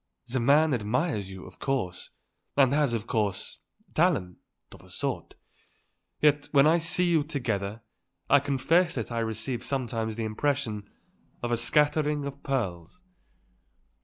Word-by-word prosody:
The 130 Hz, +2 st, -2 dB
man 145 Hz, +5 st, +4 dB
admires 110 Hz, -, -1 dB
you, 95 Hz, -1 st, -9 dB
of -, -, -14 dB
course, 120 Hz, -10 st, -2 dB, 0.5 s
and 135 Hz, -1 st, +5 dB
has, 145 Hz, -4 st, +2 dB
of 115 Hz, -2 st, -2 dB
course, 105 Hz, -5 st, -2 dB, 0.3 s
talent 145 Hz, -, +1 dB, 0.3 s
of -, -, -13 dB
a -, -, -18 dB
sort. -, -, -4 dB, 0.8 s
Yet, 145 Hz, -1 st, +3 dB
when 140 Hz, -1 st, +6 dB
I 165 Hz, +2 st, +5 dB
see 175 Hz, +2 st, +1 dB
you 170 Hz, -4 st, +3 dB
together, 115 Hz, -8 st, -3 dB, 0.5 s
I 145 Hz, -, +6 dB
confess 160 Hz, +6 st, +2 dB
that -, -, -4 dB
I 115 Hz, -, -1 dB
receive 115 Hz, +2 st, -3 dB
sometimes 115 Hz, -5 st, -2 dB
the 115 Hz, -, -3 dB
impression 110 Hz, -3 st, -1 dB, 0.5 s
of 120 Hz, -, -1 dB
a -, -, +3 dB
scattering 150 Hz, +3 st, +2 dB
of 140 Hz, 0 st, -7 dB
pearls." 120 Hz, -, -3 dB
135 Hz, 140 wpm, -28 LUFS, 110-150 Hz, 0.8 s, when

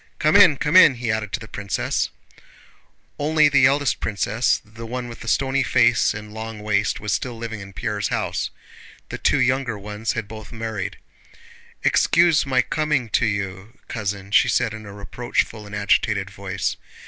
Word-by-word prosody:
"Come 155 Hz, +1 st, +2 dB
in, 180 Hz, -8 st, +7 dB
come 150 Hz, +5 st, -1 dB
in!" 165 Hz, -8 st, +8 dB
he 120 Hz, -1 st, -2 dB
added 110 Hz, -1 st, -2 dB
to 125 Hz, -, -1 dB
the 110 Hz, -, -10 dB
princess. 100 Hz, -2 st, -2 dB, 1.1 s
Only 155 Hz, 0 st, +4 dB
the 135 Hz, -3 st, +5 dB
eldest 140 Hz, 0 st, +1 dB
princess, 105 Hz, +3 st, 0 dB
the 110 Hz, +2 st, -10 dB
one 125 Hz, +1 st, -4 dB
with 115 Hz, -, -9 dB
the -, -, -10 dB
stony 135 Hz, +3 st, +1 dB
face 120 Hz, -3 st, +3 dB
and 105 Hz, 0 st, -9 dB
long 110 Hz, 0 st, -6 dB
waist, 105 Hz, -1 st, 0 dB
was 105 Hz, -2 st, -2 dB
still 125 Hz, -2 st, -3 dB
living 115 Hz, -2 st, -6 dB
in 100 Hz, -1 st, -10 dB
Pierre's -, -, -2 dB
house. -, -, -2 dB, 0.6 s
The -, -, -6 dB
two -, -, +2 dB
younger 130 Hz, -4 st, +1 dB
ones 105 Hz, +2 st, -4 dB
had 110 Hz, -3 st, -4 dB
both 110 Hz, 0 st, -10 dB
married. 110 Hz, -4 st, -4 dB, 0.9 s
"Excuse 170 Hz, -3 st, +3 dB
my 130 Hz, -2 st, +2 dB
coming 150 Hz, -6 st, -1 dB
to 115 Hz, -, +2 dB
you, 100 Hz, +2 st, -4 dB
cousin," 100 Hz, -3 st, -4 dB
she -, -, +5 dB
said 115 Hz, -3 st, +1 dB
in 110 Hz, -1 st, -9 dB
a -, -, -8 dB
reproachful 105 Hz, +1 st, -3 dB
and 105 Hz, -, -7 dB
agitated 100 Hz, -1 st, +1 dB
voice. 100 Hz, -1 st, -3 dB
110 Hz, 170 wpm, -22 LUFS, 105-130 Hz, 1.1 s, in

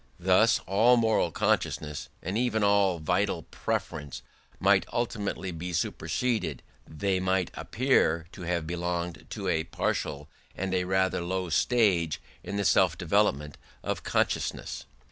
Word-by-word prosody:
Thus 95 Hz, +5 st, +4 dB
all 110 Hz, +6 st, +4 dB
moral 110 Hz, -6 st, +2 dB
consciousness, 75 Hz, -1 st, -1 dB
and 90 Hz, +4 st, -3 dB
even 110 Hz, -2 st, +1 dB
all 100 Hz, -3 st, +3 dB
vital 90 Hz, +2 st, 0 dB
preference 75 Hz, -2 st, -3 dB, 0.4 s
might -, -, +4 dB
ultimately 100 Hz, -5 st, -2 dB
be 90 Hz, +2 st, -5 dB
superseded: 110 Hz, -, -1 dB, 0.3 s
they 95 Hz, +4 st, 0 dB
might 95 Hz, -1 st, 0 dB
appear 110 Hz, -10 st, +1 dB
to 95 Hz, -, -11 dB
have 85 Hz, -2 st, -1 dB
belonged 85 Hz, 0 st, -3 dB
to -, -, -5 dB
a 80 Hz, -, +1 dB
partial 75 Hz, -3 st, -2 dB, 0.3 s
and 95 Hz, 0 st, -3 dB
rather 95 Hz, -1 st, +1 dB
low 90 Hz, +1 st, -2 dB
stage 85 Hz, -3 st, +2 dB, 0.2 s
in 100 Hz, -, -4 dB
the 100 Hz, -, 0 dB
self 90 Hz, -3 st, +4 dB
development 80 Hz, -6 st, +1 dB, 0.2 s
of -, -, -2 dB
consciousness. -, -, -1 dB
95 Hz, 125 wpm, -28 LUFS, 85-100 Hz, 0.4 s, Thus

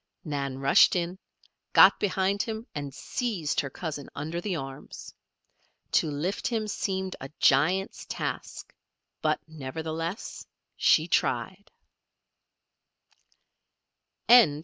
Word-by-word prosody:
Nan 140 Hz, -4 st, -3 dB
rushed 135 Hz, +6 st, +5 dB
in, 175 Hz, +1 st, -2 dB, 0.5 s
got -, -, +8 dB
behind 195 Hz, 0 st, +1 dB
him, 220 Hz, 0 st, -4 dB
and 145 Hz, -2 st, -5 dB
seized 180 Hz, -, -2 dB
her 140 Hz, -, -1 dB
cousin 145 Hz, -1 st, -6 dB
under 160 Hz, +4 st, -4 dB
the 190 Hz, -1 st, -2 dB
arms. 135 Hz, -3 st, -8 dB, 0.8 s
To 155 Hz, -, +3 dB
lift 155 Hz, +7 st, -2 dB
him 225 Hz, -3 st, -1 dB
seemed 190 Hz, -2 st, -2 dB
a 135 Hz, -, -6 dB
giant's 180 Hz, +9 st, +2 dB
task; -, -, -5 dB, 0.5 s
but 155 Hz, -1 st, +1 dB
nevertheless 160 Hz, -, -5 dB, 0.3 s
she 160 Hz, +1 st, +4 dB
tried. 190 Hz, +3 st, -1 dB
165 Hz, 100 wpm, -27 LUFS, 145-190 Hz, 0.8 s, got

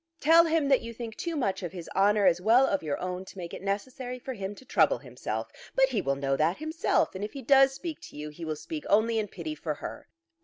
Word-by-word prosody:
Tell 330 Hz, +2 st, +6 dB
him 320 Hz, -3 st, +2 dB
that 270 Hz, -, +4 dB
you 230 Hz, -1 st, -8 dB
think 230 Hz, -1 st, -6 dB
too 340 Hz, -1 st, -3 dB
much 205 Hz, -11 st, -1 dB
of 175 Hz, -3 st, -4 dB
his 175 Hz, -3 st, -7 dB
honour 205 Hz, +1 st, +4 dB
as 180 Hz, -1 st, +4 dB
well 235 Hz, +7 st, +5 dB
of 195 Hz, -6 st, 0 dB
your 150 Hz, -3 st, -2 dB
own 180 Hz, 0 st, -4 dB
to 195 Hz, -, -13 dB
make 175 Hz, -2 st, -6 dB
it -, -, -7 dB
necessary 245 Hz, +6 st, -3 dB
for 260 Hz, +1 st, -6 dB
him 200 Hz, -2 st, -5 dB
to 260 Hz, -, -15 dB
trouble -, -, +3 dB
himself. -, -, -5 dB, 0.2 s
But 265 Hz, 0 st, +4 dB
he 230 Hz, -6 st, 0 dB
will 140 Hz, -3 st, 0 dB
know 135 Hz, 0 st, 0 dB
that 160 Hz, +5 st, +2 dB
himself, 315 Hz, +2 st, 0 dB
and 190 Hz, +1 st, -5 dB
if 210 Hz, -, -5 dB
he 275 Hz, -, -7 dB
does 270 Hz, +1 st, +5 dB
speak 325 Hz, +1 st, -6 dB
to -, -, -11 dB
you, 150 Hz, +1 st, -5 dB
he 150 Hz, +3 st, -10 dB
will 155 Hz, -1 st, -2 dB
speak 300 Hz, -, -6 dB
only 220 Hz, +2 st, +3 dB
in 210 Hz, -, -1 dB
pity 170 Hz, -5 st, -6 dB
for 155 Hz, 0 st, -4 dB
her." -, -, -8 dB
210 Hz, 260 wpm, -28 LUFS, 180-265 Hz, 0.2 s, Tell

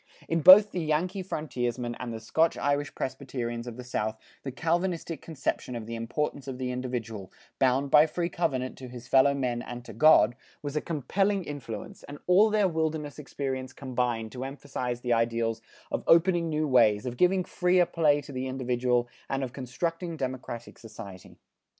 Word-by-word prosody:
In 165 Hz, 0 st, 0 dB
both 200 Hz, +6 st, +9 dB
the 180 Hz, -, -2 dB
Yankee 175 Hz, +6 st, 0 dB
frontiersmen 125 Hz, -8 st, -3 dB
and 125 Hz, -2 st, -4 dB
the 115 Hz, -, -5 dB
Scotch 160 Hz, +9 st, +1 dB
Irish 145 Hz, 0 st, -1 dB
Presbyterians 125 Hz, -3 st, -4 dB
of 120 Hz, -1 st, -7 dB
the 125 Hz, -, -7 dB
South, 110 Hz, -3 st, -2 dB, 0.2 s
the 135 Hz, -, -5 dB
Calvinistic 165 Hz, +1 st, -1 dB
conception 140 Hz, -5 st, -3 dB
of 115 Hz, -2 st, -5 dB
the 115 Hz, -, -6 dB
importance 130 Hz, +4 st, -3 dB
of 130 Hz, -2 st, -5 dB
the 125 Hz, -1 st, -3 dB
individual, 120 Hz, -6 st, -4 dB, 0.3 s
bound 135 Hz, +1 st, +2 dB
by 150 Hz, +1 st, +7 dB
free 170 Hz, +2 st, -2 dB
covenant 135 Hz, -7 st, -2 dB
to 130 Hz, -, -8 dB
his 125 Hz, -1 st, -10 dB
fellow 140 Hz, +1 st, +5 dB
men 125 Hz, -3 st, -1 dB
and 120 Hz, 0 st, -8 dB
to 115 Hz, -, -9 dB
God, 130 Hz, +1 st, +6 dB, 0.3 s
was 145 Hz, 0 st, -4 dB
a 150 Hz, -, +1 dB
compelling 195 Hz, +6 st, 0 dB
influence, 135 Hz, -9 st, -7 dB
and 145 Hz, -, -9 dB
all 195 Hz, +5 st, +5 dB
their 210 Hz, -2 st, +3 dB
wilderness 160 Hz, -3 st, -2 dB
experience 130 Hz, -2 st, -4 dB
combined 120 Hz, -4 st, -2 dB
to 130 Hz, 0 st, -6 dB
emphasize 125 Hz, -3 st, -4 dB
the 120 Hz, -1 st, +1 dB
ideals 115 Hz, -1 st, 0 dB, 0.3 s
of -, -, -2 dB
opening 170 Hz, 0 st, +4 dB
new 155 Hz, 0 st, 0 dB
ways, 115 Hz, -5 st, +4 dB
of 125 Hz, -1 st, -3 dB
giving 180 Hz, +6 st, +3 dB
freer 180 Hz, 0 st, +2 dB
play 150 Hz, -4 st, +2 dB
to 145 Hz, -, -11 dB
the 130 Hz, 0 st, -3 dB
individual, 125 Hz, -2 st, 0 dB, 0.2 s
and 135 Hz, 0 st, -1 dB
of 125 Hz, -1 st, -5 dB
constructing 165 Hz, +6 st, -3 dB
democratic 130 Hz, -3 st, -5 dB
society. 105 Hz, -5 st, -11 dB
135 Hz, 175 wpm, -28 LUFS, 120-160 Hz, 0.3 s, both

